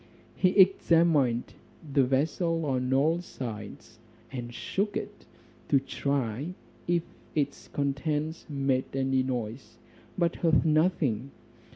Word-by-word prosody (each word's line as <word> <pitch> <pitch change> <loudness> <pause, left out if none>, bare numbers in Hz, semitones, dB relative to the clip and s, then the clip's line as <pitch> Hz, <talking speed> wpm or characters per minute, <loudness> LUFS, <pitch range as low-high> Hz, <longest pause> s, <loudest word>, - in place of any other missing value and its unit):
He 185 - +3
examined 165 -9 +4 0.4
the 140 - +5
vessel 155 +5 +1
on 130 -2 0
all 155 +6 +3
sides, 110 - -8 0.3
and 120 -3 -5
shook 200 - -2
it, - - -7 0.4
to 140 - +5
try 140 +3 -2 0.3
if 170 -1 +2 0.3
its 145 -2 -1
contents 150 +3 -2
made 135 -2 -1
any 135 -1 +2
noise, 125 -1 -4 0.4
but 170 -2 +1
heard 165 -2 +3
nothing. 150 - +2
140 Hz, 105 wpm, -28 LUFS, 130-165 Hz, 0.4 s, the